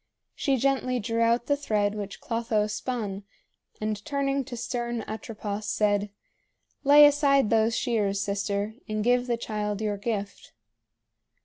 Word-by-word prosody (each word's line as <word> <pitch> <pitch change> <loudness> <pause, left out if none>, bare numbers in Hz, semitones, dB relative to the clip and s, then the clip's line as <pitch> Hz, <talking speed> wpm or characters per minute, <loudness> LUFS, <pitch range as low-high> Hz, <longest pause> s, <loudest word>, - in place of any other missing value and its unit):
She 275 -2 0
gently 255 -1 +1
drew 230 +1 -1
out 235 +1 +3
the 285 - +2
thread 210 -7 0
which 205 -2 -6
Clotho 230 -2 0
spun, 215 -2 -3 0.6
and 215 -1 -3
turning 275 -1 -1
to 240 - -7
stern 235 -1 -3
Atropos, 215 -1 -5
said: 205 -1 +1 0.7
"Lay 295 +1 +9
aside 280 -5 +4
those 225 0 +3
shears, 210 -5 0
sister, 200 +1 -2 0.2
and 215 0 -1
give 245 +1 +2
the 240 -1 0
child 210 -3 -3
your 210 -2 -1
gift." 205 -1 -4
225 Hz, 135 wpm, -27 LUFS, 210-250 Hz, 0.7 s, Lay